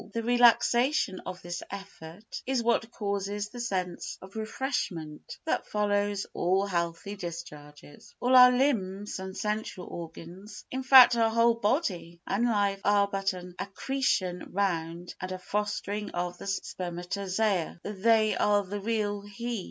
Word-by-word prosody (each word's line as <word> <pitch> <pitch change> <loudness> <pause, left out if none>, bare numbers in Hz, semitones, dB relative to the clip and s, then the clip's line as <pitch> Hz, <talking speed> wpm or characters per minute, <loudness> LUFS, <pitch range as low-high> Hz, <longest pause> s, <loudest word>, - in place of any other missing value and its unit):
The 230 - -2
relaxation 240 -1 +4
of 185 - -7
this 175 0 -5
effort 195 0 -9
is 260 -3 +1
what 230 -1 +1
causes 200 -1 -3
the 245 - -9
sense 185 -7 -3
of 190 +2 -13
refreshment 215 - -4
that 320 - -1
follows 205 -1 0
all 190 +3 +1
healthy 170 +1 -2
discharges. 150 -5 -9
All 250 +1 +3
our 250 0 +10
limbs 210 -8 0
and 190 +1 -7
sensual 210 -3 -3
organs, 175 +5 -9
in 260 - -2
fact 260 -2 +9
our 225 -1 +3
whole 230 +1 +4
body 205 - -1
and 210 +5 0
life, 200 -3 +1
are 205 0 +4
but 195 -1 -1
an 180 0 -9
accretion 195 -4 -1
round 175 -3 -2
and 185 - -4
a 185 - -3
fostering 205 +1 -3
of 175 0 -4
the - - -8
spermatozoa. 185 0 -2
They 215 +1 +2
are 205 +2 +3
the 200 +2 -5
real 205 -1 -1
"He." 225 +3 -5
200 Hz, 140 wpm, -28 LUFS, 180-225 Hz, -, our